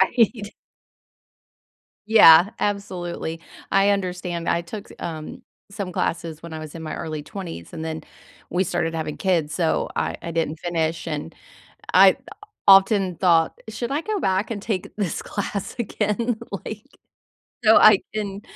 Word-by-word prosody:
Right. 215 +1 +2 1.5
Yeah, 185 -4 +8
absolutely. 180 -5 -3 0.3
I 195 +1 +4
understand, 180 -3 -2
I 170 - +2
took 200 +5 -9
s - - -12
um, 155 -2 -6 0.3
some 200 -2 -5
classes 165 -2 -3
when 170 -1 -9
I 160 - -5
was 155 0 -9
in 165 - -8
my 155 - -5
early 155 -2 -5
20s 165 - -8
and 160 - -6
then 160 -1 -4 0.5
we 180 +2 +1
started 165 -2 -2
having 155 -2 -3
kids, 170 -6 0
so 165 -3 0
I - - -1
I 170 - -5
didn't 160 -1 -2
finish, 165 -2 -2
and 150 +2 -5 0.6
I - - +7 0.5
often 195 -2 +6
thought, 165 -3 +3
should 235 +3 -4
I 290 +3 -1
go 425 +2 -2
back 190 - 0
and 205 -2 -6
take 200 -5 -3
this 200 -6 -2
class 200 -1 -4
again? 220 +2 -1 0.3
Like, 220 +3 -7 0.8
so 220 0 +7
I 215 -3 +7 0.2
can 200 -2 -4
180 Hz, 150 wpm, -23 LUFS, 165-205 Hz, 1.5 s, Yeah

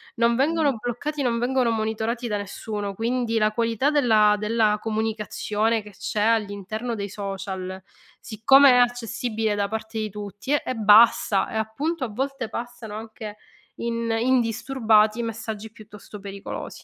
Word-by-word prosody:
non 235 0 +3
vengono 290 -1 +2
bloccati, 245 +6 -4
non 235 -2 +1
vengono 250 0 +1
monitorati 225 +2 -2
da 210 -2 -1
nessuno. 205 0 -5
Quindi 230 0 -1
la 215 0 +2
qualità 230 +5 +1
della 220 -8 +4
della 215 -1 +1
comunicazione 220 0 -1
che 210 - -12
c'è 205 +2 -3
all'interno 215 +1 -1
dei 200 -1 -4
social, 190 -2 -5 0.4
siccome 270 +5 +5
è - - +5
accessibile 235 -2 0
da 200 -1 0
parte 220 +1 -5
di 215 -1 -2
tutti, 205 +5 -7
è 290 - +2
è 255 - -2
bassa 215 -2 +5
e, - - -6
appunto, 275 +9 -2
a - - -3
volte 265 +1 -3
passano 235 -2 -7
anche 220 -1 -8 0.4
in 230 0 -2
indisturbati 230 -2 +2
i 235 - -1
messaggi 220 -1 -5
piuttosto 210 -1 -12
pericolosi. 200 0 -7
220 Hz, 145 wpm, -24 LUFS, 210-240 Hz, 0.4 s, siccome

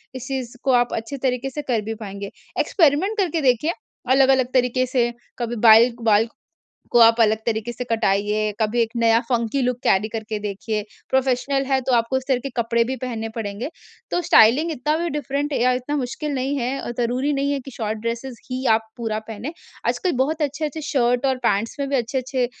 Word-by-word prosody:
इस 255 0 -6
चीज़ 260 -3 -4
को 270 - +2
आप 245 -1 +2
अच्छे 230 +5 -4
तरीके 255 0 0
से 295 +3 -5
कर 235 -4 +1
भी 225 +1 -3
पाएँगे। 200 -1 -6 0.3
एक्सपेरिमेंट 345 +6 +2
करके 340 -5 0
देखिए 265 +4 +2 0.4
अलग-अलग 265 -1 +4
तरीके 255 0 +2
से 245 -2 +1 0.3
कभी 240 0 -2
बाईल 225 +2 +8
बाल 220 0 +4 0.6
को 240 - +4
आप 230 0 +6
अलग 220 -1 +4
तरीके 225 0 -1
से 250 +1 -5
कटाइए, 210 -1 +1
कभी 220 +2 +1
एक 225 -1 +1
नया 230 -1 +4
फंकी 235 +1 0
लुक 250 -1 0
कैरी 195 +3 +3
करके 220 -1 -4
देखिए। 210 +1 -3 0.3
प्रोफेशनल 265 +1 +1
हैं 265 -1 +2
तो 255 - -1
आपको 235 +2 +1
इस 260 - -2
तरह 260 -2 +3
के - - -1
कपड़े 235 0 +2
भी 260 +3 -3
पहनने 225 -3 -3
पड़ेंगे। 210 +2 -4 0.4
तो 350 - +1
स्टाइलिंग 300 0 +5
इतना 300 +1 0
भी 340 +1 -1
डिफरेंट 290 0 -2
ए - - 0
या 255 +1 +4
इतना 255 +4 -2
मुश्किल 285 +3 -3
नहीं 270 +2 -1
है 260 +2 -2
अ, - - -5
ज़रूरी 250 +5 0
नहीं 280 0 0
है 280 - -1
कि 270 - -10
शॉर्ट 220 -3 -3
ड्रेसेज़ 235 +3 -4 0.2
ही 255 +1 -3
आप 220 - +2 0.2
पूरा 225 -3 -2
पहनें। 225 +7 -5 0.4
आजकल 365 - 0
बहुत 305 +5 0
अच्छे-अच्छे 295 +1 -2
शर्ट 245 -1 +2
और 265 -1 +2
पैंट्स 210 +2 0
में 280 - -1
भी 275 - +1
अच्छे-अच्छे 255 +1 -1
250 Hz, 200 wpm, -22 LUFS, 225-275 Hz, 0.6 s, बाईल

